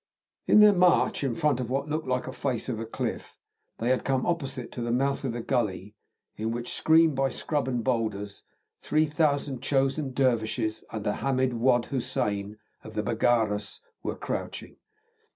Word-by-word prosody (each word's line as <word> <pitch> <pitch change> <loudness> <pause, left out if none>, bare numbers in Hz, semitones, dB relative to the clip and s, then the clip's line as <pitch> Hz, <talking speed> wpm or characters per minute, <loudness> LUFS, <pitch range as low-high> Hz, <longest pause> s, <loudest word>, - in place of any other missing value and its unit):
In 210 - +7
their 210 -1 +8
march 180 -5 +3
in 130 -4 0
front 150 -5 +1
of 125 -2 -3
what 135 +3 -1
looked 155 -1 -3
like 125 0 0
a 130 - -6
face 130 -5 -2
of 115 -2 -2
cliff, - - -4 0.4
they 115 - -1
had 130 - +1
come 130 -1 0
opposite 135 -8 -2
to 120 - -6
the 120 - -2
mouth 135 +4 0
of 130 - -1
the 120 0 -5
gully, 105 -3 -1 0.4
in 110 +1 -2
which, 120 +1 -3
screened 160 0 +4
by 135 0 +1
scrub 145 +1 -2
and 120 -3 -1
boulders, 110 -5 -2 0.4
3,000 150 -3 +1
chosen 135 +1 0
dervishes, 115 -4 0
under 105 -1 -2
Hamid 130 0 0
Wad 120 0 +2
Hussein, 105 -5 -2 0.3
of - - -11
the - - 0
Baggaras, 105 -4 +1 0.2
were - - -3
crouching. - - -5
130 Hz, 165 wpm, -27 LUFS, 115-140 Hz, 0.4 s, their